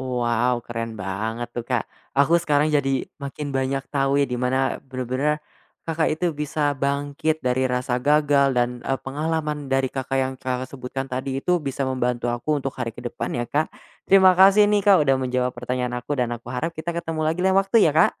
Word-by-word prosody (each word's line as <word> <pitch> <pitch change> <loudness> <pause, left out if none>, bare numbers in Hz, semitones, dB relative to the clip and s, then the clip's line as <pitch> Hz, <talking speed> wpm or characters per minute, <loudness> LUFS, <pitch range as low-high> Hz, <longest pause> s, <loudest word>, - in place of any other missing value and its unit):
Wow 120 -1 0
keren 115 -1 -4
banget 110 +5 -3
tuh 120 - -2
Kak, 125 -3 0 0.3
aku 140 +4 +4
sekarang 150 -1 +2
jadi 135 -2 +1 0.2
makin 140 +1 -5
banyak 135 0 -1
tahunya 140 0 +2
di 125 - 0
mana, 130 +1 +1 0.2
bener-bener, 130 +3 -2 0.5
Kakak 160 -1 0
itu 175 +2 0
bisa 150 -1 0
bangkit 145 +3 -1
dari 125 +1 +1
rasa 125 0 -1
gagal 145 -1 +3
dan, 120 0 0
eee, 135 - -1
pengalaman 150 +1 -2
dari 135 0 +2
Kakak, 135 0 -2
yang 130 0 -1
Kakak 130 0 -3
sebutkan 135 0 -5
tadi 130 +1 -3
itu 180 0 +3
bisa 140 -1 -3
membantu 125 -2 -1
aku 135 +6 -1
untuk 135 0 -3
hari 115 -2 -2
ke - - -8
depan 120 - -4
ya 120 - -1
Kak. 150 +5 0 0.4
Terima 190 -1 +7
kasih 195 +2 +7
nih 210 -1 +3
Kak 195 -4 +7
udah 135 -1 +3
menjawab 125 -1 0
pertanyaan 125 0 -2
aku 145 +4 -3
dan 120 -1 0
aku 120 +1 -14
harap 145 +7 -2
kita 160 +2 -3
ketemu 165 -2 -3
lagi 160 +3 0
lain 190 0 +3
waktu 195 +3 0
ya 155 - +3
Kak! 160 - +3
135 Hz, 190 wpm, -23 LUFS, 125-150 Hz, 0.5 s, Terima